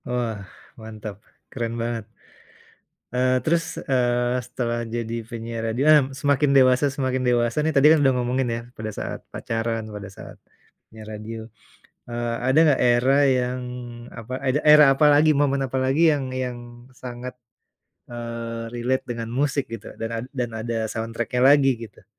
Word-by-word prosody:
Wah, 115 -5 -3 0.3
mantap. 110 -2 -8 0.3
Keren 115 -2 -3
banget. 115 -2 -3 1.1
Eee, 130 +1 +2
terus, 165 +1 +2 0.2
eee, 125 -1 +1
setelah 120 -1 -2
jadi 115 -1 -3
penyiar 115 0 -5
radio, 115 +4 -1
ah, 150 -1 +7 0.2
semakin 140 0 +2
dewasa, 130 +1 +5
semakin 130 -2 -2
dewasa 120 +1 +1
nih 160 +1 +1
tadi 135 +1 +6
kan 160 - +4
udah 135 -2 +4
ngomongin 125 +1 0
ya? - - -4 0.2
Pada 110 0 -5
saat - - -4
pacaran, 115 0 -3
pada 105 -1 -7
saat - - -11 0.5
penyiar 110 -1 -12
radio. 110 +2 -7 0.7
Eee, 120 0 -3
ada 130 +3 +3
nggak 140 - +3
era 125 +3 +4
yang 125 -1 +1 0.5
apa, 115 +2 -7
ada 130 +3 +1
era 150 0 +8
apa 145 +3 +3
lagi, 150 +2 +5
momen 140 -1 +1
apa 130 0 -2
lagi 135 +5 +1
yang 145 -2 -1
yang 125 -1 -3 0.3
sangat, 125 0 -8 0.8
eee, 115 -1 -5
relate 125 +2 -1
dengan 115 -2 -4
musik 140 +2 0
gitu, 115 - -8
dan 115 - -4
ad - - -7
dan 125 -2 -1
ada 115 +1 -3
soundtrack-nya 115 +2 -3
lagi 140 -1 +6
gitu? 115 -3 -12
125 Hz, 155 wpm, -23 LUFS, 115-135 Hz, 1.1 s, era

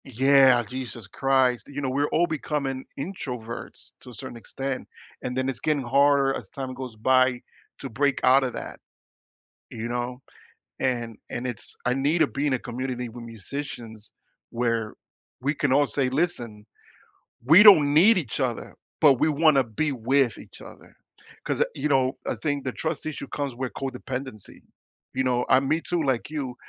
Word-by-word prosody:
Yeah, 135 -1 +5
Jesus 125 -4 -6
Christ, 130 -1 +1
you 145 0 -6
know, 135 -2 -1
we're 140 +3 +1
all 175 - +2
becoming 145 -4 -3
introverts 125 -8 -7
to - - -11
a - - -11
certain 130 +1 -8
extent, 135 +3 -5 0.3
and 125 0 -4
then 130 0 0
it's 135 -3 -3
getting 150 -3 0
harder 140 +2 +3
as - - -8
time 130 -2 -6
goes 130 -3 -7
by 130 +2 +3 0.4
to 135 - -6
break 140 +4 0
outta 130 0 +5
that, - - -7 0.9
you 115 +1 -5
know, 120 +1 -3 0.6
and 120 -3 -1
and 120 +1 -4
it's 120 -5 -7
I 125 - +2
need 140 +5 +1
to 155 - +4
be 140 +2 -2
in 140 - +1
a 130 - 0
community 125 0 -4
with 120 +1 -10
musicians 115 -1 -8 0.4
where 115 -2 -1 0.5
we 140 +3 0
can 140 -2 0
all 145 +2 +4
say, 135 -2 0
listen, 125 -8 -2 0.8
we 160 +10 +8
don't 155 -9 +8
need 195 +6 +6
each 130 - -5
other, 125 -4 -3 0.3
but 145 -3 +7
we - - +3
wanna 155 -2 +4
be 130 +7 -2
with 130 -1 +1
each - - -13
other - - -14 0.5
'cause, - - -1
uh - - +5
you 150 +2 -2
know, 130 -2 +2
I - - -1
think 145 -3 -2
the 130 - -2
trust 160 -1 -4
issue 145 -2 -5
comes 140 -4 -4
with 130 0 -4
codependency, 130 -4 -6 0.5
you 130 - +1
know, 125 -1 +1
I 130 - +6
me 150 +4 0
too, 175 -1 -1
like, 130 -3 -1
you, 140 -5 -4
130 Hz, 175 wpm, -25 LUFS, 120-145 Hz, 0.9 s, we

